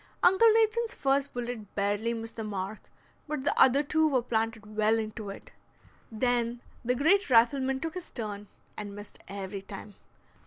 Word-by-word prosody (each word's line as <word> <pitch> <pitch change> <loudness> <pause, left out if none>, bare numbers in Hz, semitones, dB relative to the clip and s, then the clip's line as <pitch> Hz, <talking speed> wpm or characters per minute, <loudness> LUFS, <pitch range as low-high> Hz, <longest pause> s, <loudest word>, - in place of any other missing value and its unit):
Uncle 380 +5 +7
Nathan's 455 +1 +2
first 275 +1 +1
bullet 240 -4 -6
barely 205 +3 0
missed 225 0 -6
the 225 - -3
mark, 200 0 -4 0.5
but 300 -3 -3
the - - +2
other 265 +2 +5
two 315 +2 +2
were 260 -5 +1
planted 220 -2 -2
well 215 +1 +3
into 215 -1 -4
it. 195 - -10 0.6
Then 240 +1 0 0.2
the 250 +1 +1
great 325 +7 +3
rifleman 260 +3 +4
took 325 -1 -3
his 365 -2 -7
turn, 210 -3 -5 0.3
and 205 -1 -6
missed 205 0 -10
every 195 0 -5
time. 200 +1 -9
230 Hz, 160 wpm, -29 LUFS, 210-280 Hz, 0.6 s, Uncle